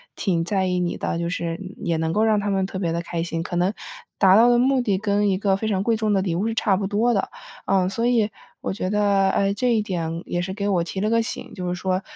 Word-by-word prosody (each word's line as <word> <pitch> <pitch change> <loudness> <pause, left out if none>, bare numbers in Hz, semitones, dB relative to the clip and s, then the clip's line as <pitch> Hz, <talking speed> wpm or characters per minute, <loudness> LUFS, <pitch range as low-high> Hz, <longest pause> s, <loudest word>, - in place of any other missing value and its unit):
挺 170 -4 0
在 190 +1 0
意 180 0 0
你 175 -1 -1
的， - - -2
就 170 0 -2
是 170 -1 -3 0.2
也 165 -1 -1
能 160 0 -1
够 215 - +2
让 215 -1 +3
他 205 0 -1
们 190 -1 +1
特 190 - -6
别 175 -3 -1
地 170 +1 -1
开 170 -1 -3
心， 165 -1 -3
可 175 +1 -5
能 180 +3 +1 0.5
达 190 -1 +6
到 230 +3 +6
的 240 0 +4
目 265 +2 +3
的 205 -6 0
跟 205 0 +1
一 190 - +1
个 195 -1 +2
非 220 - -3
常 195 -3 0
贵 225 +2 +1
重 215 -1 0
的 195 - +2
礼 180 -3 -1
物 195 +6 0
是 225 - -1
差 210 -3 +2
不 195 - -2
多 220 +5 +1
的。 195 - -1 0.4
呃， 185 -2 +2
所 230 +5 -2
以 230 -4 +2 0.3
我 - - -3
觉 185 -1 -3
得， 200 -1 +2
呃， 195 0 +1
这 240 +4 +1
一 220 - +2
点 170 -4 -3
也 175 - -2
是 190 +1 -4
给 200 0 -3
我 185 -3 +2
提 175 +3 -5
了 210 - +1
个 230 0 +3
醒， 225 - -5
就 180 -2 -5
是 180 - -1
说 185 +1 -1
195 Hz, 300 characters per minute, -23 LUFS, 180-210 Hz, 0.5 s, 达